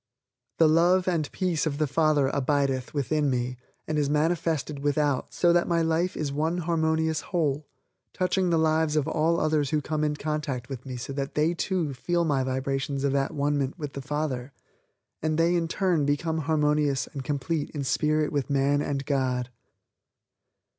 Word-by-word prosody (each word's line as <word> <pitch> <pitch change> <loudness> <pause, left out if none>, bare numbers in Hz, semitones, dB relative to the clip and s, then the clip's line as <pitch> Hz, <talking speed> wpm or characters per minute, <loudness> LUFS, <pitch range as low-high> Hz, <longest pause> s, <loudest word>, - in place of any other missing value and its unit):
The 165 - +6
Love 175 +4 +4
and 165 -5 0
Peace 175 -4 0
of 140 -2 -2
the 155 - +2
Father 145 -1 +2
abideth 140 -2 0
within 145 +1 0
me 125 0 -1 0.3
and 155 -1 0
is 145 -1 +1
manifested 155 -2 0
without 145 -1 0
so 175 -1 +3
that 175 0 +2
my 170 -1 +2
life 165 +3 0
is 145 -2 -2
one 160 +4 0
harmonious 160 -2 0
whole 150 -4 -1 0.4
touching 185 0 0
the 165 - +3
lives 160 -1 +2
of 150 -1 +1
all 165 +1 +1
others 155 -2 +1
who 155 - +1
come 155 +1 -2
in 150 -1 0
contact 150 -5 -3
with 135 -1 -7
me 130 -1 -5
so 125 +3 -6
that 135 0 -4
they, 155 +3 +2
too, 170 -4 -1
feel 170 +6 0
my 140 -4 +1
vibrations 135 +1 -2
of 140 -1 +1
at 140 +3 0
one 145 0 +1
ment 135 +3 -2
with 145 -4 -6
the 140 - -5
Father 140 -2 -3 0.7
and 155 0 0
they 165 +1 +3
in 170 -2 +1
turn 175 -2 +1
become 160 +3 0
harmonious 150 -3 +1
and 140 - -5
complete 145 +2 -2
in 145 -3 -4
Spirit 150 +2 +1
with 145 -2 -1
man 140 +1 +2
and 140 -1 -2
God. 130 -3 -1
150 Hz, 180 wpm, -26 LUFS, 140-160 Hz, 0.7 s, The